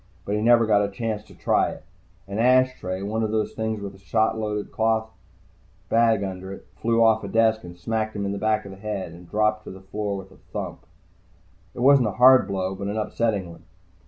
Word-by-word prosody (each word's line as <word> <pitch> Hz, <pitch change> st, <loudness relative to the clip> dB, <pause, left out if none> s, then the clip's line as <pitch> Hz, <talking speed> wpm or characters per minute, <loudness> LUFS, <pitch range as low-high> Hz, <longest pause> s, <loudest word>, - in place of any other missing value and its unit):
But 100 Hz, -, -2 dB
he 105 Hz, -, 0 dB
never 115 Hz, 0 st, +5 dB
got 105 Hz, -2 st, +3 dB
a 100 Hz, -, 0 dB
chance 105 Hz, +1 st, -3 dB
to -, -, -17 dB
try -, -, +1 dB
it. -, -, -9 dB, 0.4 s
An 100 Hz, +2 st, -4 dB
ashtray, 125 Hz, -7 st, +2 dB
one 110 Hz, +3 st, -2 dB
of 110 Hz, -, 0 dB
those 110 Hz, 0 st, -1 dB
things 110 Hz, -1 st, -3 dB
with 100 Hz, -1 st, -6 dB
a 95 Hz, -, -16 dB
shot 110 Hz, +3 st, +1 dB
loaded 105 Hz, -2 st, -3 dB
cloth 110 Hz, 0 st, 0 dB, 0.8 s
bag 115 Hz, -3 st, +3 dB
under 95 Hz, 0 st, -5 dB
it, 95 Hz, -, -10 dB
flew 115 Hz, +5 st, +2 dB
off 110 Hz, -1 st, +4 dB
a -, -, -4 dB
desk, 110 Hz, -1 st, +2 dB
smacked 110 Hz, +4 st, -2 dB
him 100 Hz, -1 st, -2 dB
in 100 Hz, -, -1 dB
the 100 Hz, -, -4 dB
back 110 Hz, 0 st, +1 dB
of 100 Hz, -, -8 dB
the 95 Hz, -, -11 dB
head, 100 Hz, -4 st, -4 dB
and 85 Hz, +1 st, -13 dB
dropped 110 Hz, 0 st, +1 dB
to -, -, -8 dB
the 95 Hz, -, -9 dB
floor 100 Hz, +1 st, -4 dB
with 95 Hz, 0 st, -10 dB
a -, -, -17 dB
thump. -, -, -7 dB, 0.9 s
It -, -, -5 dB
wasn't 135 Hz, -2 st, +6 dB
a -, -, -1 dB
hard 125 Hz, -4 st, +6 dB
blow, 95 Hz, -1 st, -2 dB
but 100 Hz, +1 st, -5 dB
an 105 Hz, +2 st, -3 dB
upsetting 105 Hz, -4 st, -1 dB
one. 85 Hz, -1 st, -15 dB
105 Hz, 220 wpm, -24 LUFS, 100-110 Hz, 0.9 s, wasn't